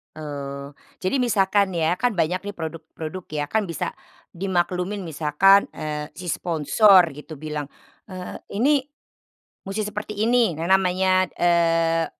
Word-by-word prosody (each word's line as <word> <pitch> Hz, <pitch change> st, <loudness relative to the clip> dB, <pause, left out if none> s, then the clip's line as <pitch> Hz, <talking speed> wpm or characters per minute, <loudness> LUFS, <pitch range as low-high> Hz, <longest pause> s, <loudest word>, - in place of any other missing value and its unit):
Eee, 140 Hz, -2 st, -6 dB, 0.3 s
jadi 185 Hz, +9 st, 0 dB
misalkan 200 Hz, -5 st, +2 dB
ya, 165 Hz, +1 st, +1 dB
kan 245 Hz, 0 st, +1 dB
banyak 180 Hz, +2 st, -1 dB
nih 205 Hz, -, -4 dB
produk-produk 165 Hz, +2 st, -7 dB
ya 145 Hz, -1 st, -1 dB
kan, 220 Hz, -2 st, +1 dB
bisa 170 Hz, -, -3 dB, 0.4 s
di 185 Hz, +3 st, -6 dB
maklumin 180 Hz, +2 st, -1 dB
misalkan, 165 Hz, +4 st, +4 dB
eee, 150 Hz, -1 st, -5 dB
si 180 Hz, -1 st, -7 dB
sponsor 175 Hz, +3 st, +4 dB
gitu 150 Hz, +3 st, -10 dB
bilang, 150 Hz, 0 st, -5 dB, 0.4 s
eee, 185 Hz, -2 st, -7 dB, 0.2 s
ini 265 Hz, +5 st, +2 dB, 0.8 s
musti 205 Hz, +2 st, -3 dB
seperti 210 Hz, 0 st, -6 dB
ini, 230 Hz, -9 st, +2 dB
nah 165 Hz, -, -2 dB
namanya, 185 Hz, 0 st, +3 dB
eee, 165 Hz, -1 st, +3 dB
180 Hz, 135 wpm, -23 LUFS, 160-200 Hz, 0.8 s, misalkan